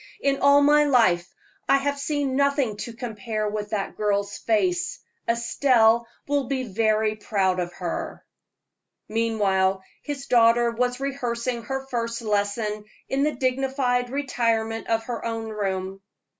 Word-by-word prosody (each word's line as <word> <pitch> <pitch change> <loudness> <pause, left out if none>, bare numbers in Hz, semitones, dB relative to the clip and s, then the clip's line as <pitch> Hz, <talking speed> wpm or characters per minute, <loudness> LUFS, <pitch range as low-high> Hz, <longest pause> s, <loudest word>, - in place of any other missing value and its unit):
"In 275 -1 +1
all 280 0 +6
my 295 +1 +5
life 185 -11 +3 0.4
I - - +6
have 285 +1 -1
seen 285 -2 -1
nothing 280 -5 +1
to 235 - -6
compare 220 -2 -4
with 210 0 -3
that 205 -2 -3
girl's 205 -1 0
face. 350 - 0 0.3
Estelle 235 -1 +3 0.2
will 285 -1 +1
be 265 -2 -1
very 215 0 +1
proud 195 -3 0
of 175 -1 -2
her." 175 -2 -5 0.8
Meanwhile 195 -4 +1 0.2
his 280 -2 -5
daughter 235 -1 +4
was 245 +2 -1
rehearsing 250 -3 -2
her 270 +1 -3
first 230 -2 -3
lesson 210 0 -1 0.2
in 270 +1 0
the 300 +1 +1
dignified 255 -1 0
retirement 230 -5 -1
of 225 0 +1
her 235 0 -5
own 225 -1 -3
room. 195 -2 -3
230 Hz, 135 wpm, -24 LUFS, 215-270 Hz, 0.8 s, all